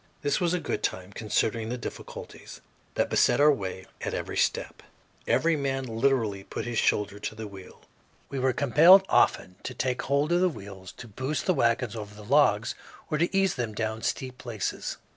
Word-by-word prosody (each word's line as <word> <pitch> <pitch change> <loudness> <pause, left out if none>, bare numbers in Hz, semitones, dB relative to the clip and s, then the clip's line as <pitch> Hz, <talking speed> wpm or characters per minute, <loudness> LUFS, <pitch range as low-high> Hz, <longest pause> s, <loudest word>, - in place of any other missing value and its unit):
This 145 +4 +1
was 175 0 +2
good 180 - -2
time, 95 +2 -3
considering 110 +1 -1
the 125 - -3
difficulties 120 - -9 0.4
that - - 0
beset 120 - +3
our 150 +1 +7
way 95 -7 -4 0.2
at - - -3
every - - -4
step. - - -1 0.5
Every 165 0 +3
man 135 -2 -1
literally 115 -4 0
"put - - -5
his 120 -2 -1
shoulder 100 0 +1
to 110 - -5
the 110 0 -6
wheel." 95 -2 -12 0.5
We 140 - -4
were 130 0 +2
compelled 165 +9 +6
often 90 0 +2
to - - -6
take 125 -1 -1
hold 140 +3 +1
of 175 +1 +3
the 185 - +4
wheels 100 - -10
to 120 - -11
boost 130 +7 -3
the 185 - +3
wagons 115 -4 +1
over 105 -2 -7
the 105 0 -11
logs 115 -4 +3 0.4
or 150 - 0
to 175 +4 +1
ease 195 -1 +3
them 115 -4 -4
down 110 0 -2
steep 130 +1 -3
places. 115 -4 -4
120 Hz, 185 wpm, -27 LUFS, 105-145 Hz, 0.5 s, our